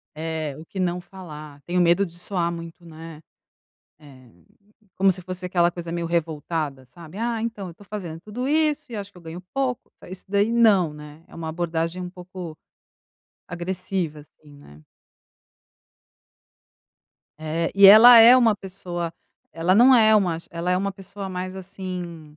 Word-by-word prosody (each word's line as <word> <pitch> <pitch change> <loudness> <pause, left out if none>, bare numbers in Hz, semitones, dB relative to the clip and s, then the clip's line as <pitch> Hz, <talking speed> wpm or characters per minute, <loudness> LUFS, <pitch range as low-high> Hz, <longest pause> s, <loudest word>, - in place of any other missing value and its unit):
É, 155 -3 -4
o 160 - -10
que 190 - -6
não 180 -1 -1
falar. 155 -6 -11
Tenho 180 +1 0
medo 175 +3 +4
de 170 -1 -11
soar 175 -2 -2
muito, 170 +1 -9
né, 160 -1 -11 0.8
eh, 130 -5 -17 0.7
como 195 0 +4
se 185 - -5
fosse 185 +1 -7
aquela 175 -1 +2
coisa 170 -1 -7
meio 170 -1 -3
revoltada, 155 -4 -3
sabe, 165 +8 -13
"Ah, 230 -1 -2
então, 220 -4 -4
eu - - -8
estou 200 +4 -18
fazendo 175 -6 -7
tudo 245 +7 -5
isso 300 -2 0
e 225 - -6
acho 200 0 -7
que 180 - -15
eu - - -17
ganho 165 +2 -8
pouco", 260 -3 -2 0.2
isso 185 - -9
daí 205 +2 +1
não, 210 -9 +4
né, 150 +1 -12
é - - -17
uma 165 -1 -6
abordagem 165 +1 -3
um 180 - -6
pouco 180 -3 -9 0.9
agressiva, 175 -2 -4
assim, 145 0 -19
né. 75 - -17 2.6
É, 160 +2 -2
e 200 0 +8
ela 230 +4 +10
é 235 +3 +9
uma 230 -4 +4
pessoa 180 -3 -6 0.4
ela 165 +4 +1
não 250 +4 +7
é 220 -2 +5
uma 180 -6 +2
che - - -13
ela 170 +1 -3
é 180 - +2
uma 195 +1 -2
pessoa 195 +1 -8
mais, 185 0 -5
assim, 180 -5 -8
180 Hz, 165 wpm, -23 LUFS, 165-195 Hz, 2.6 s, ela